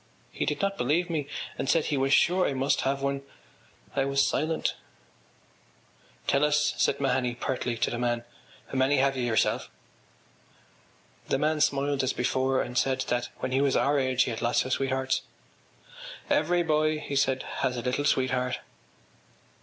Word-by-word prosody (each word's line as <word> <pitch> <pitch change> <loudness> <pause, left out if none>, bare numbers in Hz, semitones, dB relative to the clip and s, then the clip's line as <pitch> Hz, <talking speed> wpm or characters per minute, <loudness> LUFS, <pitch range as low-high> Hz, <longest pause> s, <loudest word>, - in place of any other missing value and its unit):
He - - -3
did 150 - -1
not 195 0 -1
believe 165 +8 +1
me 150 -4 -2 0.3
and 135 - -2
said 165 -2 +3
he 150 - 0
was 135 0 +1
sure 180 +5 +4
I - - -1
must 135 +2 +1
have 135 +1 -1
one. 140 0 -1 0.7
I 135 - +2
was 140 0 +2
silent. 160 +1 0 1.5
“Tell 140 - +2
us,” 150 0 +2
said - - +2
Mahony 130 -3 0
pertly 125 -1 -2
to - - +1
the 120 - -3
man, 120 -1 0 0.5
“how 135 - -2
many 135 +2 +3
have 135 0 +2
you 130 - -2
yourself?” 115 -3 +1 1.6
The - - +1
man 150 +2 0
smiled 140 -1 +1
as 130 0 0
before 130 +2 +1
and 125 +1 -1
said 130 -1 0
that 120 0 -1
when 130 - -2
he 135 +1 +2
was 140 -2 +2
our 145 +1 +2
age 130 -1 +2
he - - -3
had 110 - -5
lots 120 +1 +1
of 130 - -1
sweethearts. 130 -1 0 1.1
“Every 175 +3 +2
boy,” 155 -1 +2
he 145 -2 -5
said, 135 -1 +1 0.2
“has 125 -2 0
a 120 - -4
little 125 +3 -1
sweetheart. 130 -2 +1
135 Hz, 170 wpm, -27 LUFS, 130-145 Hz, 1.6 s, sure